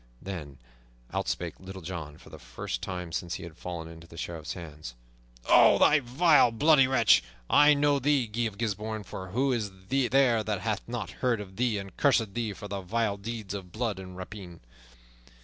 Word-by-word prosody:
Then 75 -7 -7 0.6
out - - -1
spake - - -3
Little 95 -1 -9
John, 80 -4 -6
for - - -16
the - - -10
first - - -5
time 90 -2 -5
since 85 +2 -3
he - - -7
had 85 -2 -9
fallen 85 -2 -6
into 80 0 -12
the 85 - -13
Sheriff's 85 -1 -5
hands. 75 -7 -9 0.5
"O - - +7
thou 150 - +5
vile, 145 +3 +4
bloody 135 +3 +5
wretch! 115 - +5 0.3
I 145 0 +7
know 145 0 +3
thee, 140 -1 +2
Guy 115 +2 -2
of 100 -3 -8
Gisbourne, 110 -1 -3
for 95 -1 -7
who 130 +7 +1
is 110 -4 -1 0.2
there 130 -3 +3
that 105 -3 -2
hath 110 0 -1
not 120 -1 -4
heard 125 -4 +2
of 95 -2 -9
thee 120 -3 +1
and 100 -2 -7
cursed 115 -8 +2
thee 115 -1 -2
for 105 +1 -8
thy 100 -1 -4
vile 105 +2 -1
deeds 110 -1 -6
of 95 -3 -7
blood 110 -2 -2
and 90 -1 -9
rapine? 90 -2 -9
105 Hz, 190 wpm, -28 LUFS, 90-120 Hz, 0.6 s, O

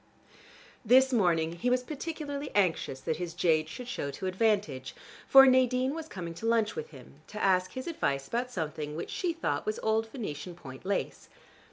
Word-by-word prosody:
This 260 +3 +5
morning 170 -6 +2
he 245 - 0
was 250 0 +2
particularly 290 0 -5
anxious 165 -9 +1
that 160 - -2
his 175 -1 -5
jade 160 -2 +2
should 250 +8 -8
show 145 -12 -3
to 140 +7 -6
advantage, 185 - 0 0.3
for 270 0 +9
Nadine 255 0 +3
was 320 0 -6
coming 175 - -6
to 225 - -2
lunch 230 -2 +2
with 155 - -5
him, 140 +1 -15
to 210 - -7
ask 185 -2 +2
his 260 - -5
advice 140 - -1
about 245 +2 -2
something 155 -6 -4
which 165 - -5
she 360 - -1
thought 215 - -2
was 215 - -1
old 220 +1 +1
Venetian 180 - -6
point 130 -2 -11
lace. 200 - -2
205 Hz, 180 wpm, -30 LUFS, 160-255 Hz, 0.3 s, for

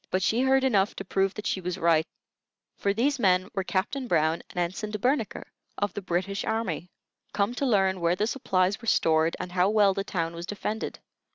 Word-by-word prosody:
But 185 0 0
she 230 +6 +2
heard 265 0 +3
enough 210 -6 +2
to 195 - -6
prove 195 +1 0
that 210 - -7
she 190 - -1
was 180 0 -3
right; 165 -1 +3 0.7
for 200 - 0
these 260 +7 +1
men 185 -2 +3
were 195 -2 -1
Captain 215 +9 -2
Brown 160 -4 +2
and - - -14
Ensign 180 +4 -2
De 210 - -3
Bernicre, 245 +1 0 0.3
of 205 0 -1
the 205 - -4
British 190 +2 -2
army, 220 -6 -2 0.4
come 205 +3 +1
to 275 +3 -1
learn 190 -5 +2
where 170 +1 +2
the 205 +3 0
supplies 195 -5 0
were 230 - -9
stored 160 -4 +3
and 180 - -5
how 180 +1 +3
well 205 -2 +4
the 195 - -2
town 165 -4 -2
was 170 +1 -7
defended. 210 +1 -4
195 Hz, 205 wpm, -27 LUFS, 180-220 Hz, 0.7 s, well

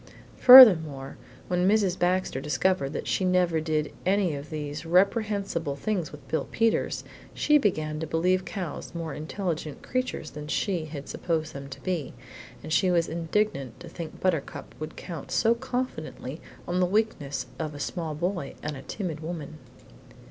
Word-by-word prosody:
Furthermore, 160 - +9 0.3
when 180 0 +1
Mrs. 200 -4 +3
Baxter 180 -6 0
discovered 150 0 0
that - - -4
she - - 0
never 180 -3 +2
did 155 -1 -1
any 190 -2 +2
of 145 +1 -7
these 150 -1 -5
reprehensible 195 -3 +1
things 180 +1 -2
with 150 - -13
Bill 160 - -1
Peters, 225 0 +1 0.3
she 300 0 +4
began 155 - -1
to 160 - -4
believe 180 +4 +1
cows 180 -4 -6
more 165 -3 -4
intelligent 155 -1 -4
creatures 255 -11 -3
than 150 0 -8
she 175 +1 -1
had 145 -2 -8
supposed 160 -2 -2
them 140 0 -8
to 135 - -9
be, 175 -7 -3 0.5
and 155 - -4
she 185 - +3
was 170 -2 +2
indignant 165 - -1
to 175 - -10
think 165 -1 -8
Buttercup 170 -6 -2
could 155 - -6
count 165 -6 -7
so 230 0 +3
confidently 235 - -5 0.3
on 180 +1 0
the 180 - +3
weakness 145 - -1
of 155 -2 -4
a - - -8
small 160 0 -3
boy 175 -3 -3
and 150 0 -3
a 135 - -8
timid 170 -2 -5
woman. 155 -2 -6
165 Hz, 160 wpm, -27 LUFS, 150-185 Hz, 0.5 s, Furthermore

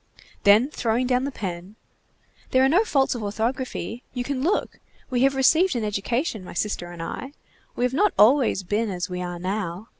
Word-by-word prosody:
Then 210 +5 +6
throwing 235 0 0
down 250 +1 +1
the 280 - -3
pen:— 185 -3 -6 0.7
"There 260 0 +4
are - - +3
no 360 +9 +4
faults 275 -11 +1
of 240 - -5
orthography. 230 +3 -3
You 245 - -1
can 265 0 -3
look. 360 +9 -1 0.3
We 245 -1 +1
have 270 +1 +3
received 315 +6 +4
an 235 - -1
education, 215 - -2
my - - -9
sister 175 -3 -2
and 170 -1 -7
I. 265 +10 -6 0.4
We - - -2
have 250 - -1
not 405 +8 +3
always 235 -3 +4
been 210 +4 -1
as 180 -1 -4
we 180 0 -3
are 175 -1 -4
now. 185 +2 -4
230 Hz, 190 wpm, -24 LUFS, 200-265 Hz, 0.7 s, Then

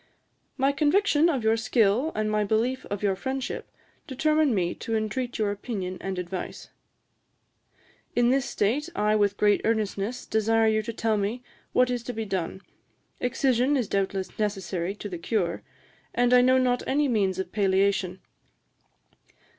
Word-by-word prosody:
'My 270 +1 +3
conviction 305 +2 +3
of 270 -8 -1
your 220 0 +3
skill, 230 +4 +2
and 215 0 0
my 210 0 +2
belief 230 +5 0
of 205 0 -4
your 195 -2 +2
friendship, 265 +6 -4 0.4
determine 305 -1 +2
me 175 -3 0
to 225 - -4
intreat 220 +3 -2
your 210 -2 0
opinion 200 -3 -5
and 190 -1 -4
advice.' 180 0 -5 1.5
'In 240 0 +4
this 265 -1 +1
state 260 +11 0
I 210 +1 +2
with 205 -1 +2
great 205 -1 +3
earnestness 220 +1 -1
desire 225 +1 +2
you 215 0 +2
to 215 - -5
tell 220 -1 0
me 210 +5 -2 0.3
what 250 0 +3
is 245 -1 -1
to 245 - -4
be 225 -1 -3
done. 190 -2 -3 0.6
Excision 260 +2 +2
is 245 -5 -1
doubtless 195 0 -2
necessary 195 -3 -2
to 210 - -7
the 180 -4 -6
cure, 175 -2 -1 0.5
and 245 +1 +3
I 250 - +7
know 255 +1 +4
not 250 -1 +2
any 290 +2 +2
means 200 -7 +1
of 190 -1 -4
palliation. 195 -2 +1
220 Hz, 155 wpm, -26 LUFS, 200-250 Hz, 1.5 s, I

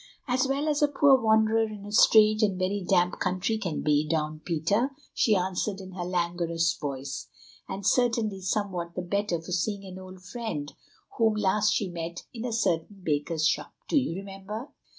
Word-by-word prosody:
"As 255 +1 +2
well 280 +3 0
as 295 -1 +1
a 295 - +6
poor 285 -1 +5
wanderer 220 0 +3
in 205 -2 -9
a 205 - -8
strange 215 0 +6
and 200 -4 +2
very 190 +2 -1
damp 180 0 +2
country 185 +5 0
can 180 -7 -3
be, 150 0 +2
Don 155 -1 -1
Peter," 180 - +1 0.2
she 215 - +3
answered 190 +2 -1
in 190 -1 -9
her 180 -1 -5
languorous 170 -2 0
voice, 135 -2 -5 0.4
"and 195 0 -5
certainly 225 -4 +2
somewhat 185 -3 -2
the 180 - -3
better 200 -1 -1
for 165 +2 -10
seeing 200 +3 -1
an 185 0 -8
old 185 -1 -11
friend 195 -9 -5 0.5
whom 225 -2 +4
last 210 0 +2
she 205 - 0
met 170 0 -5
in 235 0 -5
a 245 - -2
certain 195 -3 -1
baker's 155 +1 0
shop. 150 -2 0
Do - - -1
you 255 -11 -2
remember?" 195 +7 -7
195 Hz, 180 wpm, -27 LUFS, 170-220 Hz, 0.5 s, a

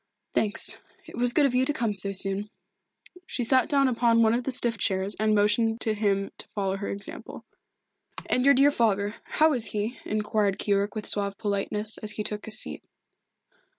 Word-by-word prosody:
"Thanks. 215 0 0 0.3
It 325 - -11
was 245 +1 +4
good 290 +3 +3
of 270 - +1
you 250 +1 +3
to 295 - +1
come 230 -7 -1
so 200 0 +1
soon." 195 +1 +2 0.8
She 245 - -2
sat 255 +1 +3
down 275 -2 +3
upon 230 -2 +2
one 220 0 +3
of 240 +1 -1
the 270 - -1
stiff 235 -3 +1
chairs 190 +1 +1
and 215 0 +2
motioned 225 +2 +2
to 220 - +1
him 200 -2 -1
to - - -5
follow 195 -2 -1
her 200 - -5
example. 200 0 -7 0.8
"And 250 - +1
your 280 +1 +5
dear 280 +2 +5
father 205 -5 0
how 315 0 +2
is 240 -4 +1
he?" 225 +4 -3
inquired 210 -2 -1
Keyork 200 0 -1
with 215 - -5
suave 200 -1 -1
politeness, 210 0 -3
as 215 -1 0
he 210 - -4
took 210 0 -5
his 220 - -2
seat. - - -4
215 Hz, 190 wpm, -26 LUFS, 205-240 Hz, 0.8 s, your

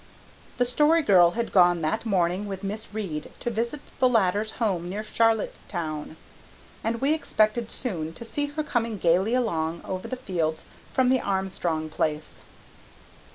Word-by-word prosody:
The 245 - +3
Story 300 +6 +3
Girl 175 -7 +6
had 235 -1 -1
gone 175 -3 +5
that 220 +9 -1
morning 185 0 +1
with 195 0 -6
Miss 210 +3 -5
Reade 190 -8 -4
to 240 - -2
visit 235 +6 -2 0.2
the 255 - +5
latter's 210 -1 +2
home 185 -7 -1
near 205 +3 -3
Charlottetown, 175 -9 -1 0.7
and 230 +1 -1
we 280 +3 +3
expected 225 -6 +1
soon 170 -13 -3
to 235 - -8
see 290 +5 -1
her 300 +2 -3
coming 230 -6 -1
gaily 185 +6 +3
along 170 -9 -1
over 185 -1 -4
the 255 - -3
fields 170 -10 -2 0.3
from 255 -1 +3
the 260 -1 +3
Armstrong 185 -5 -1
place. 155 0 -3
205 Hz, 155 wpm, -26 LUFS, 175-235 Hz, 0.7 s, Girl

